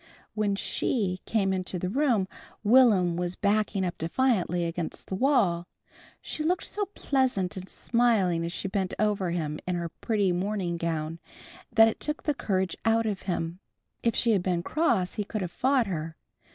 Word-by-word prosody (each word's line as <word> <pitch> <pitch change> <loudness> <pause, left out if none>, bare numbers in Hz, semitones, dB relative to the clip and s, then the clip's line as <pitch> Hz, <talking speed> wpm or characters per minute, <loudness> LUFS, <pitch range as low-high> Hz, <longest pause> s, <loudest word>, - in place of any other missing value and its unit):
When 210 -2 0
She 195 -2 -1
came 195 -4 +1
into 185 0 -2
the 180 - -2
room 235 -3 +2 0.4
Will'm 205 -7 +5
was 175 0 -2
backed 210 +1 +1
up 185 -3 -1
defiantly 180 -2 +1
against 170 0 -4
the - - -6
wall. 190 -9 +2 0.6
She - - -5
looked 350 +3 0
so 415 0 -2
pleasant 255 -10 0
and 185 0 -7
smiling 215 -8 +2
as 170 - -3
she 195 - -3
bent 190 -1 -2
over 205 -4 +1
him 155 -3 -2
in 180 - 0
her 170 -1 -3
pretty 205 +1 0
morning 180 -1 -1
gown, 165 -1 -2 0.5
that 225 0 +7
it 225 - -2
took 300 0 -3
the 295 - +1
courage 190 -8 -1
out 225 0 +3
of 205 -4 -2
him. 170 0 -2 0.4
If 230 - +1
she 235 - +2
had 200 -4 +3
been 175 -2 0
cross 250 - +1
he 210 - -2
could 215 +1 -4
have 175 - -4
fought 260 +2 +2
her. 165 -4 -4
195 Hz, 175 wpm, -28 LUFS, 175-225 Hz, 0.6 s, that